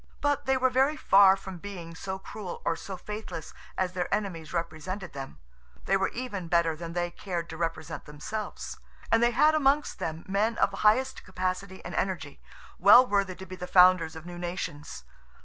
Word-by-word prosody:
But 290 -1 0
they 265 0 +3
were 260 0 +2
very 270 +4 +3
far 195 -5 +6
from 190 -2 -8
being 175 -4 -8
so 190 +3 -5
cruel 190 -1 -8
or 165 - +1
so 190 +3 -7
faithless 210 -5 -7 0.2
as 185 -1 0
their 180 -1 -2
enemies 190 -6 -2
represented 170 +3 -4
them; 135 - -7 0.5
they 195 - +3
were 195 0 +2
even 220 -8 -5
better 165 -1 +2
than 165 +1 -7
they 175 0 -1
cared 175 -4 -4
to - - -6
represent 165 -1 -4
themselves. 180 +9 -6 0.3
And 225 - +5
they 240 - +5
had 305 +6 +4
amongst 290 -1 +2
them 160 +1 -4
men 210 +4 +1
of - - +3
the - - -7
highest 260 +5 +2
capacity 185 0 -4
and - - -6
energy, 155 -7 -3 0.4
well 255 - +9
worthy 200 -5 0
to 190 - -9
be 185 0 -8
the 180 0 -7
founders 180 -3 +5
of 160 0 -9
new 175 0 -8
nations. 150 - -5
185 Hz, 185 wpm, -28 LUFS, 170-210 Hz, 0.5 s, well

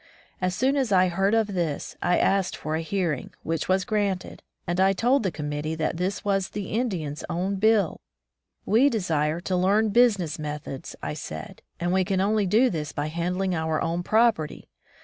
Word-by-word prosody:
As 185 0 0
soon 270 +5 +2
as 260 -6 0
I 185 -1 +5
heard 195 +4 +1
of 215 -3 +1
this, 170 -6 -2
I 180 - +2
asked 195 -1 +1
for 155 - -4
a 160 - -1
hearing, 165 -5 -2
which 165 +1 -2
was 190 0 +2
granted, 200 -3 -2 0.2
and 175 +1 -1
I 190 +1 +5
told 245 +8 +2
the 195 - 0
committee 150 0 -3
that 160 +1 -1
this 185 +4 -2
was 195 -2 +1
the 205 -2 -5
Indians' 185 - -2
own 190 +3 -1
bill. 215 0 +2 0.6
"We 240 +7 +4
desire 160 - 0
to 185 +1 -1
learn 200 +4 +3
business 205 -9 +3
methods," 150 -3 -6
I - - -2
said, 80 - -7 0.2
"and 175 +1 0
we 190 0 +3
can 190 +1 0
only 205 +1 +2
do 230 +7 +4
this 150 -4 -3
by 145 +1 -3
handling 180 +3 -1
our 160 -1 0
own 170 +1 -1
property. 215 -5 +1
185 Hz, 185 wpm, -25 LUFS, 160-205 Hz, 0.6 s, I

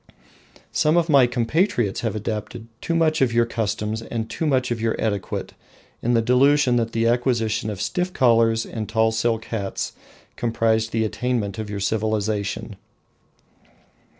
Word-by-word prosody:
Some 155 +3 +2
of 170 -1 +2
my 135 -4 +6
compatriots 120 - 0
have 115 -2 -2
adopted 110 +2 -4 0.2
too 170 - -1
much 160 -1 +2
of 130 -3 +3
your 115 0 +3
customs 110 -1 -2
and 115 0 -4
too 160 - -3
much 130 -3 +1
of 115 -2 -2
your 115 0 0
etiquette, 100 -3 -3 0.5
in 120 +1 +1
the 115 - +3
delusion 130 +2 +4
that 115 -1 0
the 115 0 +1
acquisition 115 -3 +1
of 105 -3 -5
stiff 180 - -1
collars 115 -5 +3
and 110 -2 -5
tall 110 0 +2
silk 115 0 0
hats 100 -4 -4 0.4
comprised 115 -1 +1
the 110 -1 +1
attainment 110 -3 -2
of 110 -1 -4
your 100 -1 -4
civilisation. 105 -1 -2
115 Hz, 150 wpm, -23 LUFS, 110-125 Hz, 0.5 s, my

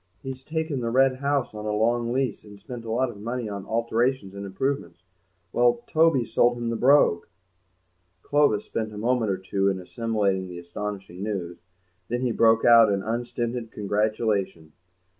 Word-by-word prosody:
He's 130 -1 -6
taken 160 -2 -2
the 115 -1 -2
Red 130 +2 +3
House 140 -2 -1
on 105 0 -6
a - - 0
long 115 +2 +1
lease 130 -1 -1
and 105 -1 -13
spent 115 +3 -8
a - - -6
lot 125 +2 +1
of 100 - -13
money 120 +1 -3
on 100 -2 -6
alterations 115 -1 0
and 100 0 -6
improvements. 130 -2 -3 0.5
Well, 120 0 +3
Toby's 155 -7 +2
sold 120 0 +3
him 120 -1 -2
the - - -1
Brogue!" 125 -8 +4 1.0
Clovis 145 -8 +2
spent 110 -1 -3
a - - -8
moment 115 0 +1
or 95 - 0
two 95 +1 0
in 95 -1 -2
assimilating 100 -1 -1
the 90 -1 -8
astonishing 95 +1 -6
news; 95 -5 -4 0.5
then 120 +1 -2
he 125 -2 0
broke 115 0 +4
out 115 -3 +7
into 100 0 -2
unstinted 120 0 -3
congratulation. 105 -5 -1
115 Hz, 170 wpm, -25 LUFS, 100-125 Hz, 1.0 s, out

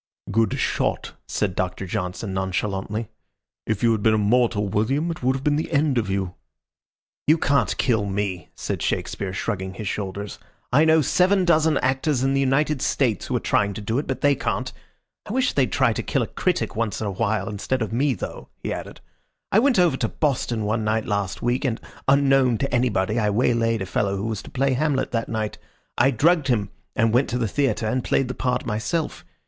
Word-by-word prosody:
"Good 110 +2 +2
shot," - - -1
said 95 -4 -1
Doctor 95 +1 -2
Johnson, 90 +3 -3
nonchalantly. 95 +3 -2 0.6
"If 110 -1 -1
you 115 - +5
had 110 -2 0
been 110 +1 +4
a - - +2
mortal, 105 0 +2
William, 135 - 0
it 165 - -7
would 130 +1 +2
have 135 - -5
been 150 0 +2
the 160 - -3
end 140 -4 +2
of 105 -4 -3
you." 95 -2 -1 0.9
"You 155 +2 +6
can't 140 -3 +1
kill 110 -5 +1
me," 95 -4 -3
said - - -4
Shakespeare, 95 -2 -2
shrugging 95 -1 -3
his 105 - -5
shoulders. 100 +1 -4 0.3
"I 150 +5 +6
know 160 0 +5
seven 185 +5 +3
dozen 160 -3 +3
actors 130 +1 +1
in 135 0 +2
the 135 - +2
United 135 +1 +1
States 120 -8 0
who - - -1
are - - +2
trying 100 -1 +1
to - - -5
do 110 +5 -1
it, 150 - -4
but 130 - -3
they 145 0 +4
can't. - - -2 0.5
I - - -4
wish 255 0 +1
they'd 130 -7 +1
try - - +3
to - - -2
kill - - 0
a - - -4
critic - - -1
once 110 -3 -1
in 110 - -3
a 100 - -1
while 100 +1 -1
instead 110 +4 -2
of 110 - -5
me, 135 +2 +2
though," - - -7
he - - -2
added. - - -8 0.5
"I 205 - +5
went 260 0 +3
over 175 -7 +4
to 115 - 0
Boston 125 -7 -1
one 110 +1 0
night 110 +1 0
last 100 -2 -2
week, 120 +3 +1
and, 125 -4 -1 0.3
unknown 135 -3 +4
to 135 +1 -2
anybody, 115 -3 +1
I 105 -2 +2
waylaid 115 -1 +1
a - - -4
fellow 100 +2 -1
who 100 - -3
was 110 -2 -3
to - - -12
play 135 0 +1
Hamlet 140 0 0
that 115 -1 -2
night. 110 -2 -3 0.4
I 125 +3 +4
drugged 150 +4 +3
him, 105 -6 0 0.2
and 115 0 +2
went 125 +3 +3
to 125 - -1
the 120 -2 0
theatre 135 0 0
and 125 +3 0
played 135 -2 +1
the - - -2
part 125 -1 -1
myself. 130 +9 -2
115 Hz, 210 wpm, -23 LUFS, 105-135 Hz, 0.9 s, You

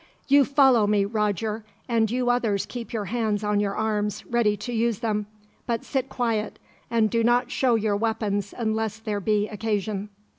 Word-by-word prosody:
"You 280 0 +6
follow 265 -6 +4
me, 205 -1 +3
Roger; 210 +1 -1 0.2
and 225 -2 +2
you 245 +1 +1
others 225 -5 0
keep 240 -2 -7
your 220 -4 -2
hands 215 0 -1
on 210 0 +1
your 200 -1 -1
arms, 210 -1 -1
ready 230 -3 +1
to 210 +5 -5
use 230 -1 +1
them. 210 -2 -1 0.4
But 235 -1 -1
sit 265 -1 -2
quiet, 230 -4 -1 0.3
and 230 -2 +3
do 230 +2 +1
not 245 +1 +2
show 250 -3 +2
your 215 -2 +1
weapons 205 -2 -1
unless 220 -2 -1
there 215 -2 -3
be 210 +1 +1
occasion." 210 -1 -2
220 Hz, 175 wpm, -25 LUFS, 210-235 Hz, 0.4 s, You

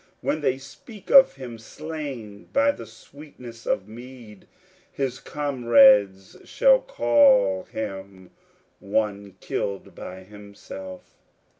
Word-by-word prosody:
When 155 - -2
they 130 -2 0
speak 160 - -13
of 270 - +7
him 125 -4 -9
slain 135 -6 -8
by 280 +1 +3
the 115 - -11
sweetness 120 0 -14
of 95 - -1
mead, 115 -2 -13 0.4
His 130 -2 -3
comrades 120 - +3
shall - - +3
call 285 - +3
him 95 -3 -8 0.5
one 100 -1 -2
killed 100 -1 -4
by 95 +1 -10
himself. 100 -2 -11
115 Hz, 105 wpm, -24 LUFS, 100-150 Hz, 0.5 s, of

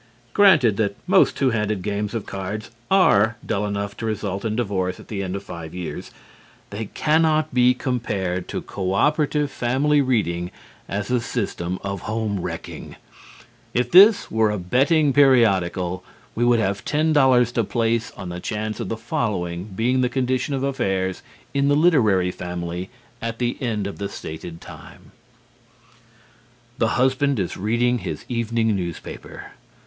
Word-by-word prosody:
Granted 150 - +5
that 100 -2 0
most - - +4
two 130 -2 +2
handed 105 -4 -1
games 105 +2 -2
of 110 - -3
cards 100 +3 -5 0.2
are 115 - +4
dull 105 -1 -1
enough 100 0 -3
to 115 - -5
result 100 -2 -3
in 110 -1 -1
divorce 95 -6 -1
at - - -14
the 100 -3 -3
end 95 -1 -3
of 100 - -5
five 85 -2 -8
years, 90 -2 -6 0.6
they 105 +2 -4
cannot 155 +5 +1
be 125 0 +4
compared 100 -9 -2
to - - -4
co 95 -1 -3
operative 150 +2 +1
family 140 +5 +2
reading 90 -10 0 0.4
as 105 +4 -3
a 125 - +3
system 95 -6 -3
of 100 -1 -4
home 110 -2 -2
wrecking. - - -7 0.8
If 125 0 +1
this 200 +4 +7
were 110 -1 +3
a 105 - -1
betting 140 - +2
periodical, 95 -10 +3 0.3
we 120 - 0
would 120 -1 +4
have 100 -2 -1
ten 155 +1 +1
dollars 130 -4 +4
to 115 -1 0
place 115 +2 0
on 95 -3 -6
the 90 0 -5
chance 105 +2 -4
of - - -4
the 115 - -3
following 95 -6 -2
being 115 +6 0
the 125 - +2
condition 130 +1 -1
of 135 - -2
affairs 95 -9 -1 0.3
in 140 0 +2
the 145 - +4
literary 110 - +3
family 90 0 -5 0.3
at 115 0 -3
the 120 0 -1
end 110 -5 -1
of 100 - -6
the 100 0 -3
stated 80 +1 -8
time: - - -13 1.7
(_The 115 - +3
husband 130 0 +2
is 90 - -2
reading 120 +4 +1
his 85 -6 -6
evening 115 -2 0
newspaper. 85 -3 -7
110 Hz, 155 wpm, -22 LUFS, 95-125 Hz, 1.7 s, this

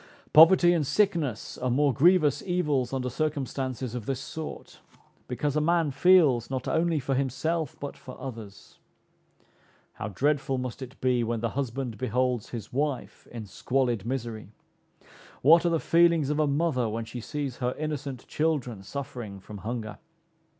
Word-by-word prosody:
Poverty 175 +2 +8
and 165 -3 +1
sickness 160 - 0
are 130 - -1
more 140 +2 +3
grievous 155 0 +4
evils 150 -9 0
under 130 -1 -2
circumstances 130 -4 -3
of 120 -3 -6
this 135 -2 -1
sort; 155 +3 -8 0.5
because 140 +3 -2
a 150 - +2
man 165 -1 +2
feels 140 -6 +4
not 130 -1 -3
only 165 -1 +1
for 135 0 -2
himself, 140 +4 -1
but 140 - -6
for 130 - -11
others. 115 -6 -9 1.1
How 100 - -5
dreadful 140 +5 0
must 125 0 -5
it 130 0 -9
be 125 -2 +2
when 115 -1 -2
the 115 - 0
husband 130 -3 -4
beholds 125 -1 0
his 115 -3 -7
wife 140 -1 -3
in 115 -3 -7
squalid 120 0 -1
misery. 115 -4 -4 0.9
What 165 +5 +6
are - - +3
the 165 -1 +1
feelings 165 -4 +3
of 150 - -1
a 155 - +3
mother 140 -5 +1
when 115 +1 -3
she 120 +2 -7
sees 140 0 -4
her 125 -1 -2
innocent 145 -4 -4
children 140 -9 -1
suffering 115 -3 -6
from 100 +2 -10
hunger! 110 0 -5
135 Hz, 155 wpm, -27 LUFS, 120-150 Hz, 1.1 s, Poverty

